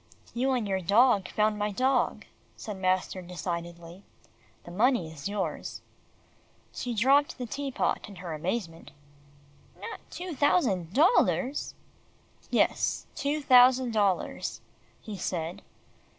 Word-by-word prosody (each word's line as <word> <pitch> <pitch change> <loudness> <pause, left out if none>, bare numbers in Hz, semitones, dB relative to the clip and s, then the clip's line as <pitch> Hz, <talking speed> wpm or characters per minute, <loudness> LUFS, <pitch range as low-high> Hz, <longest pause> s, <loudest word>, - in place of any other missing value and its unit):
"You 260 +3 +1
and 240 -5 -1
your 190 -1 -1
dog 205 +2 +4
found 210 0 +1
my 210 0 0
dog," 255 +4 +1 0.3
said 210 -3 -7
master 185 0 0
decidedly. 170 0 -6 0.6
"The 175 - -11
money 210 -4 +1
is 150 +4 -5
yours." 205 -1 -4 0.9
She 245 -2 -4
dropped 275 +6 +3
the 250 - -4
tea 275 +4 -4
pot 245 - -1
in 200 - -11
her 175 -2 -6
amazement. 165 +1 -4 0.9
"Not 455 - -7
two 355 -1 -6
thousand 245 - +1
dollars." 285 - +2 0.7
"Yes, - - +1
two 295 +1 -2
thousand 255 -2 +6
dollars," 200 -4 0 0.4
he 205 -3 -8
said. 175 +2 -3
210 Hz, 120 wpm, -28 LUFS, 180-260 Hz, 0.9 s, thousand